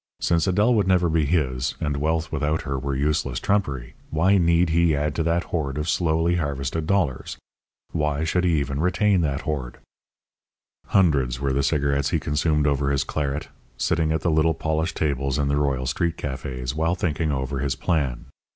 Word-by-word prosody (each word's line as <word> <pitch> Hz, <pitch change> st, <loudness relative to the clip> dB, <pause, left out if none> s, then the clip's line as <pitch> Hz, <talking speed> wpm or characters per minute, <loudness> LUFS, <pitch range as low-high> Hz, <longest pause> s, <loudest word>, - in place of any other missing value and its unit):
Since 85 Hz, +1 st, +1 dB
Adèle 105 Hz, +6 st, +3 dB
would 105 Hz, -4 st, +2 dB
never 90 Hz, -2 st, +3 dB
be 80 Hz, -1 st, +2 dB
his, 65 Hz, -5 st, 0 dB
and 75 Hz, -, -1 dB
wealth 80 Hz, +2 st, -1 dB
without 75 Hz, +1 st, -1 dB
her 70 Hz, -2 st, -3 dB
were 70 Hz, +1 st, -3 dB
useless 70 Hz, -3 st, 0 dB
trumpery, 70 Hz, -12 st, -1 dB, 0.2 s
why 95 Hz, +6 st, +3 dB
need 85 Hz, 0 st, +3 dB
he 85 Hz, -1 st, +3 dB
add 75 Hz, +1 st, -1 dB
to 80 Hz, -, -2 dB
that 85 Hz, +2 st, +1 dB
hoard 75 Hz, -5 st, -1 dB
of 75 Hz, +1 st, -2 dB
slowly 85 Hz, 0 st, +1 dB
harvested 70 Hz, 0 st, -2 dB
dollars? 85 Hz, -9 st, 0 dB, 0.5 s
Why 75 Hz, -1 st, -1 dB
should 90 Hz, +2 st, 0 dB
he 85 Hz, -4 st, +2 dB
even 70 Hz, 0 st, -2 dB
retain 95 Hz, +3 st, +2 dB
that 70 Hz, -3 st, -1 dB
hoard? 65 Hz, -6 st, -4 dB, 1.1 s
Hundreds 70 Hz, -10 st, +2 dB
were 70 Hz, -1 st, 0 dB
the 70 Hz, -, +1 dB
cigarettes 70 Hz, -1 st, +1 dB
he -, -, +1 dB
consumed 75 Hz, 0 st, 0 dB
over 70 Hz, -1 st, +1 dB
his 70 Hz, -1 st, +1 dB
claret, 70 Hz, +1 st, -3 dB, 0.3 s
sitting 80 Hz, 0 st, +1 dB
at 80 Hz, 0 st, 0 dB
the 85 Hz, -, +1 dB
little 80 Hz, +1 st, +2 dB
polished 80 Hz, +1 st, -1 dB
tables 70 Hz, -2 st, 0 dB
in 70 Hz, -1 st, 0 dB
the 70 Hz, -, +2 dB
Royal 70 Hz, -3 st, 0 dB
street 85 Hz, +5 st, -1 dB
cafés 65 Hz, -2 st, -4 dB
while 80 Hz, +3 st, 0 dB
thinking 80 Hz, -3 st, -1 dB
over 65 Hz, 0 st, -2 dB
his 70 Hz, -1 st, -1 dB
plan. 70 Hz, -8 st, -1 dB
75 Hz, 180 wpm, -24 LUFS, 70-85 Hz, 1.1 s, Adèle